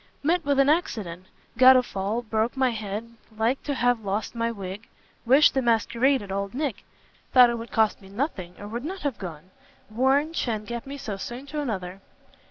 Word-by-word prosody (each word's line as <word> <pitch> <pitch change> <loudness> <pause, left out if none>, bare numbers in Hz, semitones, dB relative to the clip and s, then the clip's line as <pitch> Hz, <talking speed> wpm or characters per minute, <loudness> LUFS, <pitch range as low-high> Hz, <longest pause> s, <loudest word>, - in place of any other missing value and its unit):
"Met 335 +3 +2
with 285 -1 +1
an 275 0 +5
accident; 200 - -1 0.3
got 260 0 +9
a 250 - +3
fall, 205 +2 -3
broke 220 +3 -1
my 260 -2 +3
head, 215 0 -4 0.3
like 230 +5 +1
to 285 - -3
have 245 -3 +1
lost 200 +1 -2
my 230 -1 -1
wig. 200 0 -7 0.4
Wish 275 +5 +6
the 265 - 0
masquerade 240 +2 +2
at 195 - -8
old 200 +2 -3
Nick! 275 -6 -2 0.5
thought 250 -2 +8
it 235 - -3
would 230 0 -8
cost 220 -2 +2
nothing, 195 - -4
or 205 - -8
would 235 +4 -5
not 370 +5 -5
have 280 -7 -3
gone. 175 -1 -8 0.4
Warrant 270 +7 +2
sha'n't 220 -7 -2
get 235 +4 -6
me 280 +1 -6
so 215 -7 -5
soon 240 +7 -7
to 295 +1 -4
another!" 195 -7 -4
235 Hz, 190 wpm, -25 LUFS, 205-270 Hz, 0.5 s, got